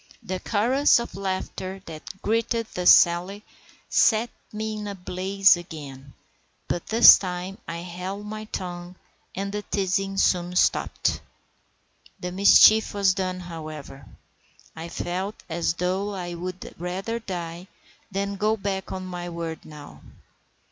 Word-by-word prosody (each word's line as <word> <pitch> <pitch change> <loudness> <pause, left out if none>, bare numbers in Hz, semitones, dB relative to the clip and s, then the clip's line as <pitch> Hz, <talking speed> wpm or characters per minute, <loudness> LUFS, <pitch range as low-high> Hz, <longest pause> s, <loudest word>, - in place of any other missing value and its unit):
The 185 0 -4
chorus 245 +9 +3
of 235 - -6
laughter 190 0 -4
that 165 +4 -10
greeted 230 +1 0
this 180 0 +6
sally 180 +4 +4 0.4
set 225 +1 +3 0.2
me 215 0 -4
in 210 - -5
a 200 - -5
blaze 190 +2 +3
again; 140 -6 -10 0.5
but 175 - -3
this 225 +2 +9
time 185 +1 -5
I 165 0 -5
held 185 +3 -6
my 215 +1 -6
tongue, 180 -3 -6 0.4
and 195 +1 -3
the 210 +1 -3
teasing 195 -1 -1
soon 180 -2 +1
stopped. - - +1 1.0
The 180 - -4
mischief 205 +3 +6
was 200 -2 +3
done, 185 -1 -3
however; 155 -5 -9 0.7
I 165 +1 -7
felt 185 +5 -3
as 165 0 -1
though 190 +3 -1
I 175 -2 -5
would 180 +1 -7
rather 190 +6 -3
die 175 -4 -6 0.4
than 200 0 -3
go 215 +2 +1
back 195 -1 -3
on 185 0 -5
my 175 -1 -6
word 165 -1 -5
now. 145 - -12
185 Hz, 135 wpm, -25 LUFS, 175-200 Hz, 1.0 s, this